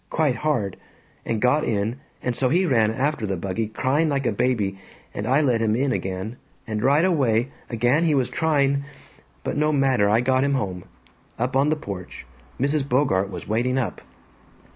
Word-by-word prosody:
Quite 145 Hz, -6 st, +1 dB
hard. 120 Hz, -10 st, -1 dB, 0.5 s
And 115 Hz, -, 0 dB
got 125 Hz, +6 st, +3 dB
in, 110 Hz, +3 st, -1 dB, 0.3 s
and 125 Hz, -1 st, -1 dB
so 130 Hz, +1 st, +1 dB
he 180 Hz, +6 st, +3 dB
ran 115 Hz, -9 st, +3 dB
after 130 Hz, 0 st, -1 dB
the 95 Hz, -1 st, -2 dB
buggy, 100 Hz, +5 st, -2 dB
crying 140 Hz, +8 st, +1 dB
like 140 Hz, -2 st, -1 dB
a 120 Hz, -, +2 dB
baby, 100 Hz, -4 st, 0 dB, 0.3 s
and 105 Hz, -, -4 dB
I 135 Hz, +5 st, +3 dB
let 125 Hz, -6 st, +2 dB
him 110 Hz, -1 st, +2 dB
in 135 Hz, +2 st, +1 dB
again, 95 Hz, +2 st, -3 dB, 0.3 s
and 110 Hz, -1 st, -3 dB
right 140 Hz, +7 st, +4 dB
away 135 Hz, -8 st, +2 dB, 0.2 s
again 120 Hz, +7 st, +2 dB
he 155 Hz, -3 st, +3 dB
was 130 Hz, -3 st, +2 dB
trying 140 Hz, -3 st, +1 dB, 0.6 s
But -, -, -3 dB
no 150 Hz, +1 st, +2 dB
matter. 135 Hz, -8 st, +3 dB
I 110 Hz, +3 st, +3 dB
got 130 Hz, +1 st, +2 dB
him 140 Hz, 0 st, +1 dB
home. 95 Hz, -8 st, -3 dB, 0.5 s
Up 125 Hz, +3 st, -1 dB
on 140 Hz, +2 st, +3 dB
the 155 Hz, -, +2 dB
porch. 100 Hz, -, -8 dB, 0.3 s
Mrs. 140 Hz, +1 st, 0 dB
Bogart 100 Hz, -8 st, +2 dB
was 90 Hz, -3 st, -7 dB
waiting 120 Hz, +4 st, 0 dB
up. 125 Hz, -4 st, -2 dB
125 Hz, 185 wpm, -23 LUFS, 110-140 Hz, 0.6 s, right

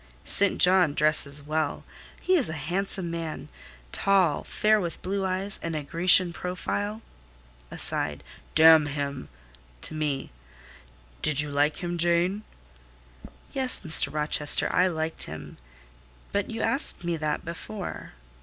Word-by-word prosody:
"St. 200 Hz, 0 st, +4 dB
John 180 Hz, -5 st, +5 dB
dresses 150 Hz, -1 st, +1 dB
well. 155 Hz, 0 st, -2 dB, 0.4 s
He 370 Hz, -, +1 dB
is 290 Hz, -, +1 dB
a -, -, -4 dB
handsome 175 Hz, +3 st, -3 dB
man: 165 Hz, -2 st, -6 dB, 0.4 s
tall, 190 Hz, -6 st, +1 dB
fair, 215 Hz, 0 st, +1 dB
with 170 Hz, -3 st, -5 dB
blue 195 Hz, +1 st, -2 dB
eyes, 190 Hz, +2 st, -3 dB
and 165 Hz, -1 st, -4 dB
a 150 Hz, -, -3 dB
Grecian 175 Hz, +3 st, +6 dB
profile." 205 Hz, +5 st, -4 dB, 0.7 s
(Aside.) -, -, -1 dB, 0.3 s
"Damn 160 Hz, -1 st, +7 dB
him!"—(To 65 Hz, -, -6 dB
me.) 150 Hz, -3 st, -3 dB, 0.9 s
"Did 150 Hz, -2 st, +4 dB
you 150 Hz, -1 st, -5 dB
like 145 Hz, +5 st, 0 dB
him, 175 Hz, 0 st, -4 dB
Jane?" 175 Hz, +4 st, +1 dB, 1.1 s
"Yes, 260 Hz, -2 st, +1 dB
Mr. 160 Hz, -4 st, +2 dB
Rochester, 150 Hz, -1 st, 0 dB
I 180 Hz, -, +4 dB
liked 160 Hz, -2 st, -3 dB
him: 80 Hz, +1 st, -10 dB, 0.7 s
but 200 Hz, 0 st, -2 dB
you 225 Hz, -, -4 dB
asked 270 Hz, -9 st, -1 dB
me 170 Hz, -1 st, -2 dB
that 150 Hz, -1 st, -3 dB
before." 180 Hz, +4 st, -7 dB
165 Hz, 125 wpm, -26 LUFS, 150-190 Hz, 1.1 s, Damn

